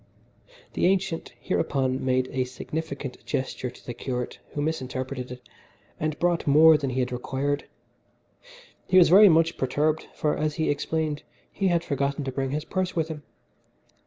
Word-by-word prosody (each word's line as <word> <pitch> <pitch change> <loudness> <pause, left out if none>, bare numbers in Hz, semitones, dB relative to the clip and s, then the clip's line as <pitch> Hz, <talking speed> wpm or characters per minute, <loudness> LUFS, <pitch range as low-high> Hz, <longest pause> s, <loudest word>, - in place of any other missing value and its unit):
The - - +2
ancient 185 -3 0
hereupon 130 -7 0
made 130 0 +1
a 130 -1 0
significant 140 +1 -6
gesture 130 -1 -3
to 125 - -16
the 120 - -5
curate, 125 0 -4
who - - -4
misinterpreted 130 -4 -3
it, 125 0 -10 0.5
and 155 -1 -1
brought 175 -2 0
more 155 +3 +7
than 140 -3 -1
he 130 +1 0
had 125 - -2
required. 140 +3 -2 1.2
He 185 - +4
was 175 -3 +7
very 200 +3 +9
much 165 0 +3
perturbed, 150 +4 0
for, 150 - 0
as 150 0 -1
he 160 -3 +1
explained, 155 +1 -2 0.3
he 195 - 0
had 170 -2 +2
forgotten 140 0 -1
to 135 - -3
bring 135 0 -2
his 150 +3 -3
purse 185 -1 -2
with 160 -1 0
him. 155 -2 -6
145 Hz, 160 wpm, -26 LUFS, 130-160 Hz, 1.2 s, very